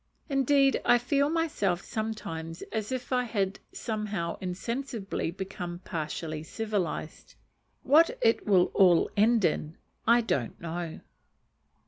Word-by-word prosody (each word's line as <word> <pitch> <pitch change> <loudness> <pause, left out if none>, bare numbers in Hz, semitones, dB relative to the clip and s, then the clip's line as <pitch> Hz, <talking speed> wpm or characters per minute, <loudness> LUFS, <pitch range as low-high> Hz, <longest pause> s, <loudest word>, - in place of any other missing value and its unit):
Indeed 275 0 +3
I 245 - +6
feel 280 +4 +1
myself 290 - 0
sometimes 165 -7 -5
as 220 0 -3
if 255 0 -3
I 250 0 +2
had 200 -4 -1
somehow 210 -6 -3
insensibly 205 +1 -3
become 180 -1 -5
partially 155 -1 -4
civilized. 195 -3 -4 0.5
What 315 +5 +5
it 225 0 +2
will 185 -3 +4
all 180 -4 +5
end 220 0 +4
in, 155 0 -1 0.3
I 235 +1 +6
don't 130 - -2
know. 170 0 -5
205 Hz, 115 wpm, -29 LUFS, 175-240 Hz, 0.5 s, I